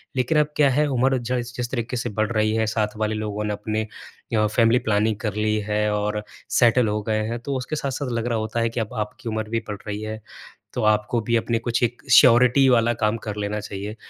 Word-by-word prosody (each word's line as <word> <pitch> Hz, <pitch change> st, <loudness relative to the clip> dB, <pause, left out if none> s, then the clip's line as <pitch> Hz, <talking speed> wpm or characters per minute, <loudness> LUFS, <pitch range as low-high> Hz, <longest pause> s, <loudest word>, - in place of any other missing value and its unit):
लेकिन 130 Hz, +5 st, +1 dB
अब 150 Hz, -, +3 dB
क्या 145 Hz, -2 st, +4 dB
है, 145 Hz, +3 st, +2 dB
उम्र 130 Hz, 0 st, +2 dB
ज 120 Hz, 0 st, -5 dB
इस 120 Hz, 0 st, -6 dB
जिस 120 Hz, -1 st, -2 dB
तरीके 125 Hz, 0 st, -2 dB
से 120 Hz, 0 st, -2 dB
बढ़ 110 Hz, +2 st, -1 dB
रही 110 Hz, -1 st, +1 dB
है, 110 Hz, 0 st, +1 dB
साथ 110 Hz, -1 st, 0 dB
वाले 110 Hz, 0 st, -1 dB
लोगों 105 Hz, -1 st, -3 dB
ने 105 Hz, 0 st, -1 dB
अपने 110 Hz, +1 st, -2 dB, 0.5 s
य 110 Hz, -1 st, +3 dB
फैमिली 115 Hz, +2 st, +4 dB
प्लानिंग 110 Hz, 0 st, +1 dB
कर 105 Hz, -3 st, -2 dB
ली 110 Hz, 0 st, +1 dB
है 105 Hz, 0 st, +1 dB
और 105 Hz, 0 st, -1 dB, 0.3 s
सेटल 120 Hz, -1 st, +4 dB
हो 105 Hz, 0 st, -1 dB
गए 110 Hz, 0 st, 0 dB
हैं। 120 Hz, +1 st, -3 dB
तो 135 Hz, +3 st, -4 dB
उसके 130 Hz, +4 st, -4 dB
साथ-साथ 140 Hz, -1 st, -3 dB
लग 115 Hz, -1 st, -2 dB
रहा 115 Hz, -2 st, 0 dB
होता 110 Hz, +2 st, -2 dB
है 115 Hz, -, +1 dB
कि 115 Hz, -, -4 dB
अब 110 Hz, +2 st, -3 dB
आपकी 115 Hz, +3 st, -5 dB
उम्र 110 Hz, -1 st, -3 dB
भी 115 Hz, 0 st, 0 dB
बढ़ 105 Hz, -1 st, -4 dB
रही 105 Hz, 0 st, -4 dB
है, 110 Hz, 0 st, -5 dB, 0.5 s
तो -, -, -2 dB
आपको 110 Hz, +2 st, +2 dB
भी 115 Hz, +2 st, 0 dB
अपने 115 Hz, 0 st, 0 dB
कुछ 120 Hz, 0 st, -1 dB
एक 120 Hz, +1 st, -1 dB
श्योरिटी 125 Hz, +2 st, +6 dB
वाला 120 Hz, -1 st, +3 dB
काम 110 Hz, 0 st, 0 dB
कर 105 Hz, -2 st, -3 dB
लेना 105 Hz, +1 st, -2 dB
चाहिए। 105 Hz, +1 st, -6 dB
110 Hz, 240 wpm, -23 LUFS, 105-120 Hz, 0.5 s, श्योरिटी